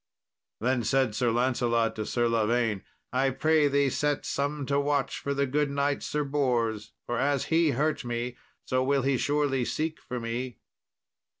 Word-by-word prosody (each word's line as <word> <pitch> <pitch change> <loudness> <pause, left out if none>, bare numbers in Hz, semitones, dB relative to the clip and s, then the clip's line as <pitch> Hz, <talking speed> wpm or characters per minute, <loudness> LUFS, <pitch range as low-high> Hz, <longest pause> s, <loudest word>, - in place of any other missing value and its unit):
Then 125 +2 +1
said 130 -1 +2
Sir 120 +2 +1
Lancelot 120 -1 +1
to 110 - -3
Sir 120 -1 +1
Lavaine, 115 -2 +1 0.3
"I 135 +1 +2
pray 150 +3 +3
thee 140 -1 +2
set 145 +1 0
some 145 0 -2
to 140 +1 +1
watch 145 -1 0
for 140 0 -2
the 140 0 +2
good 145 +2 0
knight 140 0 0
Sir 150 0 -1
Bors, 120 -6 0
for 120 - -2
as 140 0 +1
he 165 -1 +4
hurt 150 +1 0
me, 120 0 -3 0.3
so 130 0 +1
will 135 0 +1
he 135 0 +2
surely 145 -2 +1
seek 155 +5 -2
for 125 - -5
me." 120 +2 -4
135 Hz, 170 wpm, -28 LUFS, 120-145 Hz, 0.3 s, he